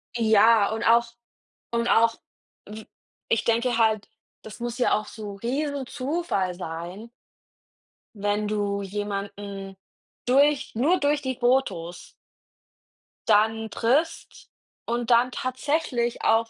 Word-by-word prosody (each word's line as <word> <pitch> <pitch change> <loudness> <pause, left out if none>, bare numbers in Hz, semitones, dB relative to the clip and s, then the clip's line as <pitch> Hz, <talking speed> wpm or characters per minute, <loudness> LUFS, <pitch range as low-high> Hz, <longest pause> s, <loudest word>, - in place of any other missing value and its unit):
Ja, 220 -1 +5
und 225 +1 -3
auch 235 +1 +5 0.7
und 235 0 0
auch, 225 0 +4 0.5
w 215 +1 -9 0.4
ich 225 - +2
denke 235 +1 +1
halt, 220 -2 +2 0.4
das 220 +2 -10
muss 240 +1 -4
ja 250 - +2
auch 215 - 0
so 210 -2 -8
Riesenzufall 270 - -2
sein 175 +5 -7 1.1
wenn 205 +1 -1
du 205 -1 -1
jemanden 200 -1 -5 0.5
durch 280 +3 +3
nur 310 +11 +3
durch 290 +1 +1
die 260 -1 -3
Fotos 240 -9 0 1.2
dann 220 +1 +3
triffst 270 +11 -1 0.4
und 240 +1 -2
dann 240 +2 +4
tatsächlich 255 -2 -2
auch 225 +1 +3
230 Hz, 110 wpm, -25 LUFS, 205-255 Hz, 1.2 s, Ja